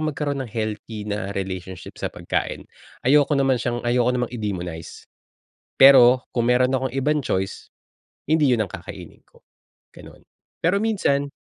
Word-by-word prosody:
magkaroon 145 -2 -2
ng 130 - -5
healthy 110 -1 -5
na 105 -2 -3
relationship 95 -1 -6
sa - - -2
pagkain. - - -4 0.4
Ayoko 145 +2 +4
naman 135 -3 +2
siyang, 120 0 -3
ayoko 120 0 +2
namang 125 -1 -2
i-demonize. 90 -8 -6 0.7
Pero 130 -2 +7
kung 120 -1 0
meron 125 +1 +3
akong 130 -1 -1
ibang 150 +3 +1
choice, 95 -8 -3 0.6
hindi 155 -2 +3
iyun 115 -4 +2
ang 95 - -15
kakainin - - -10
ko, - - -23 0.5
ganon, - - -15 0.3
pero 185 +5 +1
minsan 145 -11 0
125 Hz, 140 wpm, -22 LUFS, 105-140 Hz, 0.7 s, Pero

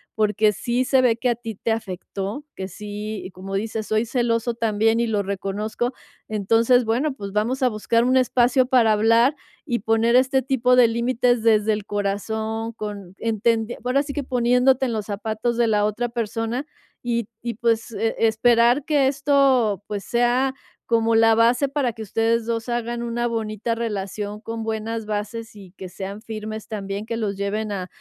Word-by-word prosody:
porque 210 0 +2
sí 240 +4 -1
se 265 0 +4
ve 245 -3 +3
que 250 +1 0
a 240 - +1
ti 225 -2 -7
te 225 - -2
afectó, 205 +3 -4
que 190 - -5
sí, 210 +1 -6
como 195 +1 -6
dices: 215 +1 -3
"Soy 215 +1 +1
celoso 235 0 0
también 225 0 +1
y 235 - +1
lo 210 -2 0
reconozco". 205 +5 -3 0.3
Entonces, 225 +4 +3
bueno, 255 +7 0
pues, 200 -5 -7
vamos 235 +6 0
a 255 - +4
buscar 230 +1 +1
un 255 +1 +3
espacio 255 0 +3
para 245 -3 +4
hablar 230 +6 +4 0.3
y 240 -6 -1
poner 225 +2 +2
este 265 +1 +3
tipo 250 -1 +2
de 245 -2 +7
límites 240 0 +1
desde 220 -1 +4
el 210 -1 -4
corazón 220 +3 -2
con 205 -4 -7
entender 225 +1 0
ahora 265 +3 +2
sí 285 -1 -6
que 290 -1 -3
poniéndote 250 +1 +3
en 235 - -2
los 215 -2 -3
zapatos 220 +3 -2
de 240 -1 +3
la 210 -1 +2
otra 230 +3 -1
persona 230 +3 -3 0.4
y 235 -3 -1
y, 235 -1 -4
pues, 230 0 0
e-esperar 230 +4 +2
que 290 -4 +3
esto, 270 -6 +2
pues, 205 -1 -4
sea 245 +2 +1 0.3
como 230 -1 +2
la 225 0 +5
base 240 +4 +3
para 270 -4 -1
que 220 0 -7
ustedes 225 +2 0
2 230 0 -3
hagan 240 0 -2
una 235 0 -2
bonita 225 0 -2
relación 210 -2 -4
con 225 -1 -5
buenas 220 0 -3
bases 215 +2 -4
y 195 -3 -13
que 185 - -8
sean 195 +3 -7
firmes 220 -1 -6
también, 200 -1 -5
que 230 - -3
los 210 -3 -2
lleven 210 +2 -2
a, 185 -2 -4
225 Hz, 175 wpm, -23 LUFS, 210-240 Hz, 0.4 s, de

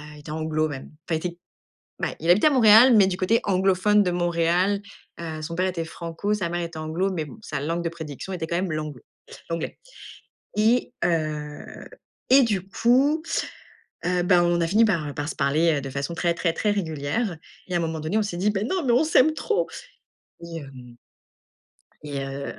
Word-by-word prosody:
il - - -13
était 150 +1 -9
anglo 155 0 -1
même 135 -2 -7 0.2
enfin, 160 -2 0
il 180 - -2
était, 175 0 -9 0.6
bah, - - -2
il 165 +2 +1
habitait 210 +12 +6
à - - 0
Montréal, 235 -1 +7
mais 195 -2 +6
du 185 -1 -1
côté 205 +5 +2
anglophone 195 +2 +3
de 180 - 0
Montréal, 175 +3 +1 0.4
heu, 160 -2 -5
son 165 +2 -5
père 185 +1 +1
était 170 -3 -3
franco, 170 +5 -3
sa 180 -5 -2
mère 175 +1 -2
était 165 -1 -6
anglo 165 +5 -1
mais 160 -4 -2
bon, 185 - -12
sa 145 -7 -4
langue 165 +4 -2
de - - +1
prédiction 160 +2 -7
était 165 -3 -3
quand 170 - -2
même 180 -2 -1
l'anglo, 155 -5 -5 0.5
l'anglais, 165 -1 -4 0.8
et 230 +3 +2
heu, 155 -3 -3 0.4
et 265 +1 +7
du 195 -5 -1
coup, 270 +9 +2 0.8
heu, 180 0 +1
bah, 175 -1 +4
on 175 0 +2
a 165 - +1
fini 220 +5 +4
par, 170 -8 0
heu, 145 - -5
par 145 +2 -4
se - - -5
parler, 155 +4 +2
heu, - - -2
de 135 - -6
façon 140 +5 -4
très, 170 0 +1
très, 170 -1 0
très 210 +4 0
régulière, 170 +2 -2 0.3
et 180 - -6
à - - +4
un - - 0
moment 160 -1 -2
donné, 160 +8 -1
on 215 - +2
s'est 185 -4 -4
dit: 205 +3 +2
«Mais 195 - 0
non, 360 +7 -1
mais 240 - +3
on 260 +6 +4
s'aime 310 -1 +4
trop», 455 +8 -1 0.7
et 170 -1 -7
hem 130 -5 -11 1.1
et 145 -2 -5
heu, 135 +1 -5
170 Hz, 205 wpm, -24 LUFS, 155-205 Hz, 1.1 s, Montréal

